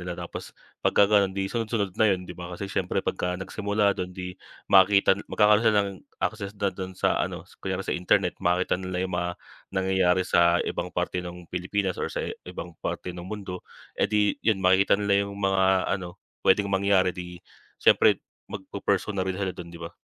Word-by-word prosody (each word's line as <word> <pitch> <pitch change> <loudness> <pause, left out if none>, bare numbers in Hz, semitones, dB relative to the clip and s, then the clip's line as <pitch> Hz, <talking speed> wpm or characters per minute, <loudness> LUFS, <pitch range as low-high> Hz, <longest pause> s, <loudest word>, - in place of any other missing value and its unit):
nila 90 0 -5
tapos 85 -1 -7 0.3
pagka 100 - +5
gano'n 100 -2 +4
'di 95 - 0
sunod-sunod 110 -4 -1
na 110 - +5
yun, 90 -1 -3
'di - - -5
ba? 90 0 -7
Kasi 100 - -5
syempre - - -1
pag - - -1 0.2
nagsimula 100 +1 0
dun, 90 0 -4
'di 90 -1 -5 0.4
makita 95 0 +6
magkakaro'n 105 +2 +4
ng 100 -1 +3 0.4
access 100 -2 -3
na 100 -1 0
dun 95 0 -6
sa - - +1
ano, - - -3 0.2
kunyari 95 0 -2
sa - - -2
internet 90 +1 +1
makakita 90 0 +1
nila 90 0 -2
yung 95 - -5
mga 90 0 -1 0.5
nangyayari 95 -1 +2
sa 85 -1 +4
ibang - - -3
parte 90 - -1
ng 90 0 -8
Pilipinas 95 +1 -1
or - - -1
sa - - -2 0.2
ibang 90 -1 -7
parte 90 - -4
ng 90 0 -8
mundo, 95 -3 -6 0.4
eh, - - +1
'di 105 -1 +1
yun 110 -3 +3
makikita 95 +2 +4
nila 100 -1 +2
yung 100 - -8
mga 95 -1 +2
ano 90 -1 -8 0.3
pwedeng 100 +1 +4
mangyari 95 -2 +3
'di 90 -1 -8 0.4
siyempre - - +5 0.2
magpu-pursue 100 +1 -2
na 95 - 0
rin 95 - -1
sila 95 -2 -2
dun, 85 -1 -9
'di 85 - -10
ba? 85 0 -7
95 Hz, 185 wpm, -26 LUFS, 90-100 Hz, 0.5 s, makita